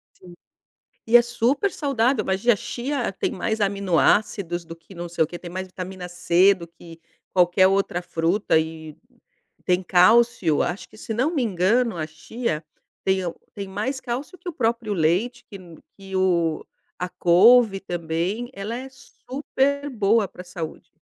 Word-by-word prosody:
Sim, 180 -1 -15 0.7
e 225 - +2
é - - +6
supersaudável. 250 - 0
Imagina, 195 +6 +2
a - - -2
chia 250 +3 -3
tem - - -2
mais 220 +3 -2
aminoácidos 195 -2 +1
do 165 - -9
que 165 +4 -17
não 175 0 -5
sei 170 -1 +1
o - - -2
quê, 175 +2 -7
tem 175 - -9
mais 185 +1 -5
vitamina 185 0 -7
C 180 +2 +4
do 170 -3 -10
que 165 0 -14 0.3
qualquer 180 +1 +4
outra 195 -2 0
fruta 170 +2 +1
e 160 -1 -6 0.7
tem 180 +1 +1
cálcio. 185 -2 +4
Acho 180 +3 -3
que, - - -17
se 220 - -5
não 260 +9 0
me 275 -6 +1
engano, 215 +3 +1
a 155 -1 -3
chia 160 +1 -4 0.4
tem 190 -1 +1
o 170 - -4 0.2
tem 200 -3 -6
mais 235 +8 -3
cálcio 265 +9 -5
que 360 - -13
o - - -7
próprio 230 -6 -1
leite, 190 +9 0
que 200 - -10
n 175 -4 -14 0.2
que 195 -1 -8
o 170 -4 +1 0.3
a 180 - -3
couve 195 +5 +5
também. 175 +6 -3
Ela 205 +2 -5
é 265 +1 -7
super 280 +2 -3
boa 220 -3 +2
para 180 - -11
a - - -13
saúde. 170 -3 -7
195 Hz, 170 wpm, -23 LUFS, 175-235 Hz, 0.7 s, é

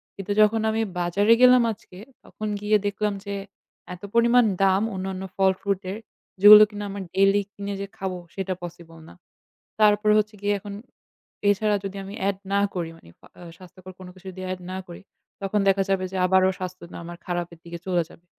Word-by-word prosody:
কিন্তু 195 +1 -6
যখন 215 +1 +3
আমি 220 +1 -1 0.2
বাজারে 200 +6 +3
গেলাম 250 -1 +7
আজকে, 185 -3 -16 0.3
তখন 215 - -7
গিয়ে 210 +1 +3
দেখলাম 210 +1 -1
যে, 200 0 -4 0.6
এত 180 - -12
পরিমাণ 235 +1 +5 0.2
দাম 195 +1 +3
অন্যান্য 190 0 -4
ফল-ফ্রুট 195 0 +1
এর 200 - -5 0.4
যেগুলো 210 +1 +11
কিনা 205 0 -6
আমার 200 0 -5
ডেইলি 195 +1 +4
কিনে 200 0 -5
যে 200 - -4
খাবো 190 -1 -4 0.2
সেটা 190 -1 -2
পসিবল 170 -1 -10
না। - - -14 0.7
তারপরে 210 0 +4
হচ্ছে 215 0 -3
গিয়ে 205 0 +1
এখন 200 +1 -9 0.8
এছাড়া 210 +1 +2
যদি 195 0 -6
আমি 195 - -9 0.2
add 200 - -3 0.2
না 200 - +3
করি 170 -2 -3
মানে 85 - -18 0.2
আ - - -16
আ - - -10
স্বাস্থ্যকর 185 0 -13
কোন 185 - -10
কিছু 185 0 -19
যদি 185 +1 -10
add 185 - -9
না 185 - -4
করি, 175 - -10 0.4
তখন 195 +2 -1
দেখা 195 0 +2
যাবে 190 -1 +1
যে 190 - -4
আবারও 190 0 +4
স্বাস্থ্যতা 185 -2 -8
আমার 170 +1 -9
খারাপের 175 -1 -4
দিকে 170 0 -8
চলে 175 -2 +1
যাবে। 170 - -19
195 Hz, 185 wpm, -24 LUFS, 185-205 Hz, 0.8 s, যেগুলো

